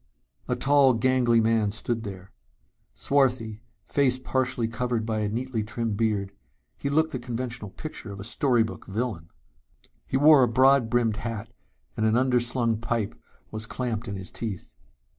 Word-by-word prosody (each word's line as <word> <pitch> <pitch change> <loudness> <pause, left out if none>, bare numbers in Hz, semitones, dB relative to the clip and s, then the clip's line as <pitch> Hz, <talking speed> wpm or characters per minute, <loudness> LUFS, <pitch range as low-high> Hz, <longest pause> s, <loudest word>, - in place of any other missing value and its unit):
A - - 0
tall 140 -2 +4
gangly 120 0 +3
man 110 -2 +2
stood 115 +2 -3
there. 95 -3 -8 0.6
Swarthy, 125 -6 0 0.2
face 130 -3 +2
partially 130 -2 -1
covered 115 -1 -2
by 110 -1 -1
a 105 -1 0
neatly 120 +1 -2
trimmed 115 0 -3
beard, 100 -3 0 0.4
he 140 - -3
looked 160 +3 +2
the - - -3
conventional 120 -3 -5
picture 135 -2 -8
of 100 - -8
a - - -6
story 120 +1 +2
book 110 - -7
villain. 100 -5 -3 0.8
He 130 - 0
wore 145 0 +7
a 125 - +5
broad 130 +1 +4
brimmed 115 -3 +1
hat 115 -2 -5 0.4
and 110 - -1
an 110 +1 +3
under 125 -1 +3
slung 120 -2 0
pipe 115 -2 -2 0.4
was 110 +1 -6
clamped 120 -2 -3
in 100 - -4
his 95 -1 -7
teeth. 105 -6 -6
115 Hz, 160 wpm, -26 LUFS, 110-130 Hz, 0.8 s, wore